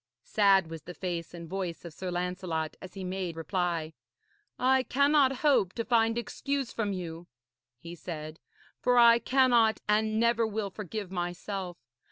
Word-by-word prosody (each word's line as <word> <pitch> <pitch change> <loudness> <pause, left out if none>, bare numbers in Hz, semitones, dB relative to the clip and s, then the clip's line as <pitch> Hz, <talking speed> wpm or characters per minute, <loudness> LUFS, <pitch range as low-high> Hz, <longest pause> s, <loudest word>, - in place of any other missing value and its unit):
Sad 195 -5 +3
was 165 -1 -6
the 180 - -10
face 170 -3 -4
and 170 -1 -9
voice 180 -2 -4
of 170 - -8
Sir 185 +2 -5
Lancelot 175 -3 -3
as 185 - -10
he 195 - -6
made 185 -2 -3
reply. 165 -2 -2 0.6
'I 260 +1 +3
cannot 280 0 +4
hope 230 -11 +4
to 230 - -3
find 225 -1 +2
excuse 270 +3 -3
from 210 -3 -1
you,' 175 -2 -6 0.5
he 170 +6 -9
said, 155 -2 -7 0.4
'for 250 0 +2
I 235 -1 +7
cannot 240 -3 +3
and 215 +1 +2
never 235 0 +3
will 210 -2 -3
forgive 205 -1 -6
myself. 180 +1 -4
195 Hz, 155 wpm, -29 LUFS, 175-230 Hz, 0.6 s, I